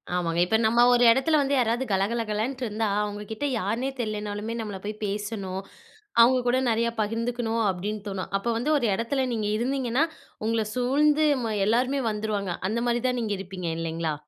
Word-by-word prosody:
ஆமாங்க. 170 -1 0
இப்ப 220 +4 +2
நம்ம 235 +2 +2
ஒரு 245 0 +4
இடத்துல 290 +5 +3
வந்து 280 0 0
யாராவது 240 +1 +1
கலகலகலன்ட்டு 220 +5 -1
இருந்தா, 220 0 -1 0.2
அவங்க 205 0 -4
கிட்ட 255 +7 -3
யாருன்னே 230 +7 -1
தெரியலனாலுமே 210 0 -3
நம்மளா 205 -3 -5
போய் 210 0 -3
பேசணும், 200 -2 -3 0.6
அவங்க 255 +2 +6
கூட 245 +1 +3
நெறையா 230 +1 +1
பகிர்ந்துக்கணும் 230 +1 -1
அப்டின்னு 200 +3 -4
தோணும். 195 -1 -4
அப்ப 200 - -6
வந்து 285 +7 0
ஒரு 240 -5 +1
எடத்துல 260 +4 -1
நீங்க 215 -2 -1
இருந்தீங்கன்னா, 260 +3 +1 0.4
உங்கள 225 -1 +1
சூழ்ந்து 295 +5 +3 0.2
ம 220 - -1
எல்லாருமே 255 +4 +2
வந்துருவாங்க. 210 -3 -2 0.2
அந்த 235 +2 -1
மாரி 240 0 +1
தான் 250 -1 0
நீங்க 215 -2 -1
இருப்பீங்க 185 -3 -5
இல்லைங்களா? 165 -1 -2
225 Hz, 165 wpm, -26 LUFS, 205-245 Hz, 0.6 s, அவங்க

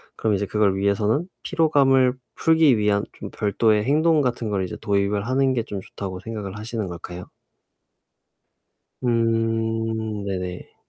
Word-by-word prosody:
그럼 110 - 0
이제 100 +1 -1
그걸 100 -1 +1
위해서는 105 - +1 0.2
피로감을 135 -5 +3 0.2
풀기 160 -6 +4
위한 105 -1 +2
좀 - - -8
별도의 105 +1 +2
행동 155 +4 +3
같은 120 -3 -1
걸 100 -2 0
이제 90 - -5
도입을 100 0 0
하는 130 +1 +2
게 115 - 0
좀 100 -4 -6
좋다고 95 -1 -7
생각을 105 -3 -6
하시는 110 -2 -4
걸까요? 90 +1 -8 1.8
음 115 -2 0
네네. 90 -2 -5
110 Hz, 280 characters per minute, -23 LUFS, 100-125 Hz, 1.8 s, 풀기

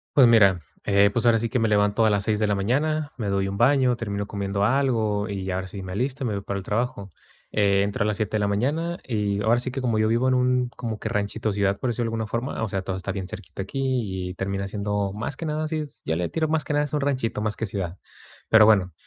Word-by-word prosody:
Pues, 130 -4 +8
mira, 100 -7 +5 0.2
eh, 100 0 +4
pues, 120 - 0
ahora 115 -1 +5
sí 115 - -1
que 120 +2 -1
me 115 - +2
levanto 105 +1 +3
a - - +5
las 100 -1 +1
6 105 0 0
de 105 - +2
la 105 - +1
mañana, 145 +9 0
me 110 -4 -3
doy 100 0 0
un 100 0 -4
baño, 130 +1 +4
termino 100 -3 -3
comiendo 100 0 -2
algo, 110 -4 +1
y 95 -2 -3
ahora 95 0 -3
sí 95 0 -8
me 95 - -7
alisto 130 +7 -2
me 110 - -1
voy 100 - -3
para 100 0 -4
el 100 - -5
trabajo. 105 -2 -2 0.4
Eh, 100 -1 +3
entro 100 +4 -2
a - - 0
las 105 -1 -1
7 110 0 -2
de - - -1
la 105 - +1
mañana, 150 +12 0
y 105 -4 -1
ahora 115 +2 +3
sí 125 - -2
que 135 - -4
como 115 -4 0
yo 110 - +3
vivo 120 +4 +2
en 130 - +3
un 125 0 +2
como 115 -3 -5
que - - -4
ranchito, 110 0 -1
ciudad, 100 -1 +1
por 130 - -1
decirlo 120 0 -2
de 115 0 -2
alguna 110 -1 -2
forma, 115 +3 -3
o 110 - 0
sea, 95 0 -2
todo 95 0 -4
está 95 +1 -4
bien 95 -2 -4
cerquita 95 0 -8
aquí 110 -6 -2
y 90 - -5
termina 100 +1 -3
siendo 100 -1 -2
más 110 +6 -4
que 165 - -5
nada, 155 0 -1
así 155 0 -2
es, 150 -2 -6
ya 80 - 0
le 85 -1 -1
tiro 160 -1 0
más 155 -1 +1
que - - -2
nada 145 0 +2
es 145 - -8
un 150 - +1
ranchito 130 -6 -1
más 105 0 -1
que 115 - -3
ciudad. 95 -2 -4 0.5
Pero 110 -1 +7
bueno, 95 -5 +4
110 Hz, 275 wpm, -24 LUFS, 100-125 Hz, 0.5 s, Pues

